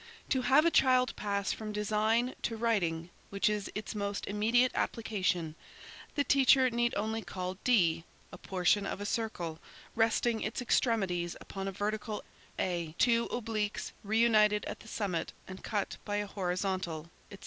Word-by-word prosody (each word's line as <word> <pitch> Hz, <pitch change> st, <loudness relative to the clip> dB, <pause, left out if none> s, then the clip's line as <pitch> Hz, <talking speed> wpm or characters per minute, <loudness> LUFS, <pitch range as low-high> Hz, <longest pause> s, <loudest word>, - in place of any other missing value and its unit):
"To 260 Hz, -, +2 dB
have 275 Hz, +5 st, +5 dB
a 335 Hz, -, +4 dB
child 255 Hz, -3 st, +4 dB
pass 200 Hz, -1 st, -1 dB
from 215 Hz, -1 st, -6 dB
design, 215 Hz, +4 st, +1 dB
to 225 Hz, -, -2 dB
writing, 175 Hz, -7 st, 0 dB, 0.2 s
which 200 Hz, 0 st, +1 dB
is 210 Hz, -1 st, -1 dB
its 210 Hz, +1 st, -4 dB
most 200 Hz, -1 st, -3 dB
immediate 230 Hz, +5 st, +2 dB
application, 180 Hz, -8 st, -1 dB, 0.6 s
the 285 Hz, -, +2 dB
teacher 265 Hz, -2 st, +5 dB
need 240 Hz, 0 st, +1 dB
only 220 Hz, +2 st, -1 dB
call 185 Hz, -2 st, -5 dB
D, 170 Hz, -9 st, +3 dB, 0.3 s
a -, -, -9 dB
portion 190 Hz, +2 st, +1 dB
of -, -, -4 dB
a 205 Hz, -, -4 dB
circle, 180 Hz, -8 st, -3 dB, 0.4 s
resting 225 Hz, 0 st, +2 dB
its 215 Hz, -, -3 dB
extremities 195 Hz, -8 st, +1 dB
upon 195 Hz, 0 st, -6 dB
a -, -, -2 dB
vertical; 210 Hz, +2 st, -3 dB, 0.3 s
A, 170 Hz, -3 st, -2 dB
two 235 Hz, -1 st, +3 dB
obliques 215 Hz, -3 st, -2 dB
reunited 215 Hz, -1 st, +3 dB
at -, -, -5 dB
the -, -, -14 dB
summit 195 Hz, -7 st, -2 dB
and 185 Hz, 0 st, -9 dB
cut 205 Hz, -2 st, -2 dB
by 205 Hz, -, -3 dB
a 205 Hz, 0 st, 0 dB
horizontal, 180 Hz, -4 st, -3 dB, 0.2 s
etc. 200 Hz, -, -11 dB
210 Hz, 155 wpm, -31 LUFS, 190-230 Hz, 0.6 s, have